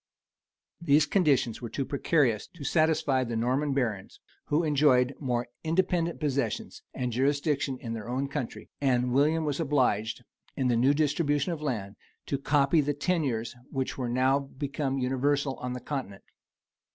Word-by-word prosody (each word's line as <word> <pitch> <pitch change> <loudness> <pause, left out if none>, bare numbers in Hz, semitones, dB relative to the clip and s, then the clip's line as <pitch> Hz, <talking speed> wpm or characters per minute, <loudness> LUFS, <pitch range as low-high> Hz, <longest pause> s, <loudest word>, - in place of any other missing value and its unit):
These 150 -2 +4
conditions 140 - +2
were 120 - -5
too 135 - -3
precarious 140 -6 +1
to 160 - -9
satisfy 155 -4 +2
the 120 -2 -4
Norman 130 +6 0
barons, 115 -8 -2 0.3
who 150 +3 +1
enjoyed 140 -4 +3
more 125 -4 -1 0.2
independent 170 0 0
possessions 140 -7 -2
and 125 -1 -3
jurisdictions 140 +2 0
in 115 -2 -4
their 110 0 -6
own 130 +3 -1
country; 140 -4 -5
and 125 -2 +2
William 155 +4 +3
was 145 0 -1
obliged, 125 -7 +1 0.3
in 130 -3 0
the 120 - +3
new 130 +5 +4
distribution 145 +1 +1
of 155 - -6
land, 110 -9 -3 0.3
to 140 - -2
copy 145 +2 +3
the 145 0 -1
tenures 140 -9 -1
which 135 -1 -2
were 125 -3 -3
now 130 +3 +3
become 140 0 -3
universal 135 +2 0
on 125 0 -4
the 125 - -4
continent. 125 -7 -5
135 Hz, 150 wpm, -28 LUFS, 125-150 Hz, 0.3 s, These